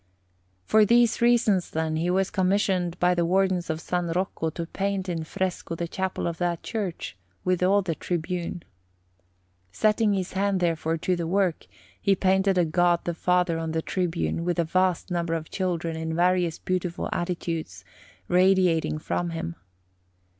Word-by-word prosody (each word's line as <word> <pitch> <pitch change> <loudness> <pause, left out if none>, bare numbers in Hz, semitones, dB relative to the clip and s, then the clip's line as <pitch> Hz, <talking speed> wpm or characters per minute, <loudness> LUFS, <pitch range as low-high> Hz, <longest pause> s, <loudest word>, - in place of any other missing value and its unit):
For 220 0 +5
these 235 +2 +4
reasons, 225 -6 +3
then, 160 0 -1
he 170 +2 0
was 190 +1 +1
commissioned 185 -2 +1
by 180 0 +4
the 175 -1 +1
Wardens 185 0 +1
of 160 - 0
S. 175 -2 -1
Rocco 180 -3 -1
to 165 +1 -5
paint 195 +2 -2
in 170 -3 -2
fresco 180 0 -3
the 170 +1 -3
chapel 190 +2 -3
of 170 -1 -3
that 175 -2 -1
church, 200 - -4 0.3
with 180 -1 +1
all 195 +2 +3
the 170 -3 -1
tribune. 175 +1 -3 1.1
Setting 210 - +2
his 190 -2 -2
hand, 195 0 +1
therefore, 165 -2 0
to 180 +3 0
this 170 -1 -3
work, 185 - 0 0.3
he 195 - +3
painted 190 +1 +2
a 175 - +4
God 175 +1 +2
the 175 - -2
Father 180 0 +1
in 160 -1 -3
the 160 0 -1
tribune, 170 -2 -1
with 175 0 -1
a 170 - +3
vast 185 +2 0
number 170 -1 0
of 160 -1 -6
children 170 -3 -2
in 160 0 -3
various 175 -1 +2
beautiful 180 -1 -2
attitudes, 165 - -3 0.4
radiating 180 -4 +3
from 170 +2 -2
Him. 125 - -4
180 Hz, 160 wpm, -26 LUFS, 165-190 Hz, 1.1 s, For